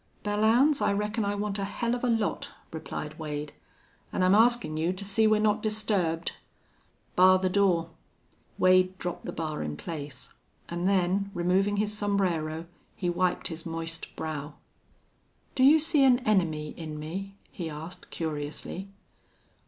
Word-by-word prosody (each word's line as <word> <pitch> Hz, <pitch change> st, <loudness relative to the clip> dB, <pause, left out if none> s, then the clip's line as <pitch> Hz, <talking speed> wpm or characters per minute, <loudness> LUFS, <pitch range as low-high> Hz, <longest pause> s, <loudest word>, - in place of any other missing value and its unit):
"Belllounds, 225 Hz, +8 st, +3 dB
I -, -, +3 dB
reckon 210 Hz, +2 st, -1 dB
I 200 Hz, 0 st, -1 dB
want 205 Hz, 0 st, -2 dB
a -, -, -1 dB
hell 235 Hz, +4 st, -2 dB
of 245 Hz, -, -3 dB
a -, -, +2 dB
lot," 225 Hz, -3 st, 0 dB, 0.2 s
replied 155 Hz, -1 st, -6 dB
Wade. 150 Hz, -1 st, -4 dB, 0.6 s
"An' 185 Hz, -, 0 dB
I'm 185 Hz, +1 st, +5 dB
askin' 235 Hz, -6 st, +4 dB
you 165 Hz, +3 st, 0 dB
to 195 Hz, +2 st, -7 dB
see 215 Hz, +3 st, +3 dB
we're 215 Hz, 0 st, +4 dB
not 215 Hz, 0 st, +2 dB
disturbed." 200 Hz, -7 st, 0 dB, 0.8 s
"Bar 185 Hz, +1 st, +7 dB
the 185 Hz, 0 st, 0 dB
door." 180 Hz, -4 st, +2 dB, 0.7 s
Wade 185 Hz, 0 st, +4 dB
dropped 175 Hz, -1 st, -5 dB
the -, -, -3 dB
bar 155 Hz, -2 st, -3 dB
in 75 Hz, -1 st, -4 dB
place, 140 Hz, -, -7 dB, 0.4 s
and 175 Hz, +2 st, 0 dB
then, 195 Hz, +1 st, +1 dB
removing 190 Hz, +4 st, +2 dB
his 210 Hz, 0 st, 0 dB
sombrero, 175 Hz, -6 st, -1 dB, 0.3 s
he 175 Hz, -2 st, -1 dB
wiped 180 Hz, +1 st, 0 dB
his 165 Hz, -1 st, -6 dB
moist 165 Hz, 0 st, -4 dB
brow. 150 Hz, -2 st, -5 dB, 1.0 s
"Do -, -, -1 dB
you 295 Hz, +4 st, +8 dB
see 300 Hz, -2 st, +3 dB
an 255 Hz, -2 st, +6 dB
enemy 165 Hz, -9 st, +1 dB
in 155 Hz, -2 st, -6 dB
me?" 190 Hz, +6 st, -6 dB, 0.2 s
he 170 Hz, -3 st, -5 dB
asked, 160 Hz, +4 st, -9 dB
curiously. 160 Hz, +4 st, -4 dB
185 Hz, 150 wpm, -28 LUFS, 160-210 Hz, 1.0 s, you